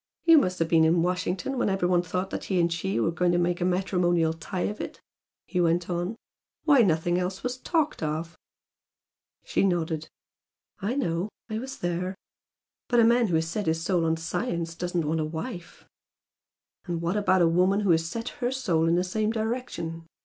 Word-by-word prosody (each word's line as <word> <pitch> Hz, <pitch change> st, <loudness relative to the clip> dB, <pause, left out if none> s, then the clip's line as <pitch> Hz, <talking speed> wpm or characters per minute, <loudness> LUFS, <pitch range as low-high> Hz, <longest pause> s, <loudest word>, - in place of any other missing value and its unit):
"You 330 Hz, -2 st, +8 dB
must 185 Hz, -8 st, -1 dB
have 165 Hz, -, +1 dB
been 165 Hz, -1 st, +4 dB
in 165 Hz, +1 st, +3 dB
Washington 180 Hz, +8 st, -1 dB
when 245 Hz, -, +2 dB
every 190 Hz, -2 st, +1 dB
one 180 Hz, -1 st, +3 dB
thought 180 Hz, +2 st, -3 dB
that -, -, -4 dB
he 190 Hz, -2 st, 0 dB
and 170 Hz, 0 st, +2 dB
she 190 Hz, +3 st, -1 dB
were 165 Hz, -, +1 dB
going 175 Hz, +1 st, +1 dB
to -, -, +3 dB
make 175 Hz, 0 st, 0 dB
a -, -, +2 dB
matrimonial 180 Hz, -3 st, +1 dB
tie 175 Hz, +3 st, -5 dB
of 210 Hz, -, -2 dB
it" -, -, -7 dB, 0.5 s
he 180 Hz, -, -1 dB
went 170 Hz, +1 st, +1 dB
on 175 Hz, +5 st, -2 dB, 0.5 s
"Why, 285 Hz, -5 st, +6 dB
nothing 175 Hz, -2 st, +2 dB
else 185 Hz, +1 st, -3 dB
was 250 Hz, 0 st, -2 dB
talked 310 Hz, +2 st, 0 dB
of!" 160 Hz, +2 st, -3 dB, 1.1 s
She -, -, 0 dB
nodded. 165 Hz, -4 st, 0 dB, 0.7 s
"I 215 Hz, +5 st, -2 dB
know! 180 Hz, -7 st, -1 dB, 0.2 s
I 215 Hz, -, -1 dB
was 265 Hz, +2 st, -6 dB
there. 175 Hz, +2 st, -2 dB, 0.7 s
But 240 Hz, -, +3 dB
a -, -, +7 dB
man 235 Hz, 0 st, +4 dB
who 175 Hz, -, 0 dB
has 160 Hz, 0 st, +1 dB
set 200 Hz, +4 st, -3 dB
his 165 Hz, 0 st, 0 dB
soul 175 Hz, -1 st, +1 dB
on 165 Hz, 0 st, +1 dB
science 170 Hz, 0 st, -3 dB
doesn't 175 Hz, -1 st, -2 dB
want 160 Hz, +2 st, 0 dB
a -, -, +1 dB
wife." 165 Hz, +4 st, -7 dB, 1.0 s
"And 175 Hz, -3 st, -2 dB
what 170 Hz, +3 st, -1 dB
about 185 Hz, -3 st, +3 dB
a -, -, +5 dB
woman 185 Hz, +4 st, +3 dB
who 200 Hz, -3 st, +3 dB
has 165 Hz, 0 st, +3 dB
set 230 Hz, +7 st, -4 dB
her 245 Hz, 0 st, 0 dB
soul 170 Hz, -12 st, +1 dB
in 165 Hz, -, +3 dB
the 180 Hz, -, +2 dB
same 215 Hz, +4 st, -1 dB
direction?" 220 Hz, -8 st, -3 dB
180 Hz, 200 wpm, -27 LUFS, 165-205 Hz, 1.1 s, You